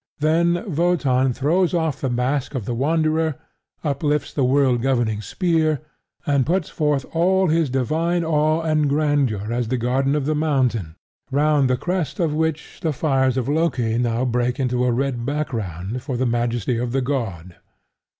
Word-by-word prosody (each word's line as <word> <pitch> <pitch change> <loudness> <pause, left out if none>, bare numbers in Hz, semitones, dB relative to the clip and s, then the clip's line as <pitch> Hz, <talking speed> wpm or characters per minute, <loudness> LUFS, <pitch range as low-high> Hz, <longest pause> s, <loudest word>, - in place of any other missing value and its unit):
Then 170 +4 +2
Wotan 140 -7 +2
throws 165 +8 +1
off 160 -4 -1
the 135 - 0
mask 125 +3 -1
of 120 -6 -3
the 120 - -2
Wanderer; 155 +3 +1 0.5
uplifts 150 0 -1
the 140 - 0
world 130 -2 +3
governing 120 -5 0
spear; 160 - 0 0.5
and 140 -2 +2
puts 170 +3 0
forth 150 -4 0
all 185 +2 +2
his 160 -2 +2
divine 160 +7 0
awe 155 0 +1
and 155 -2 +1
grandeur 140 -8 0
as 120 -1 -1
the 130 +3 -1
guardian 130 +4 +1
of 145 -3 -1
the 155 - +1
mountain, 130 - 0 0.3
round 145 -1 +2
the 125 - +2
crest 175 0 -2
of 165 -4 +1
which 160 0 -2
the 160 -4 0
fires 135 -3 +1
of 130 -1 -1
Loki 130 -7 0
now 120 +1 0
break 125 +1 0
into 125 -1 0
a 125 - +2
red 125 -1 -1
background 115 - -3
for 130 -1 -4
the 130 - 0
majesty 120 0 0
of 120 0 -3
the 135 - +1
god. 105 - -3
140 Hz, 165 wpm, -22 LUFS, 125-155 Hz, 0.5 s, world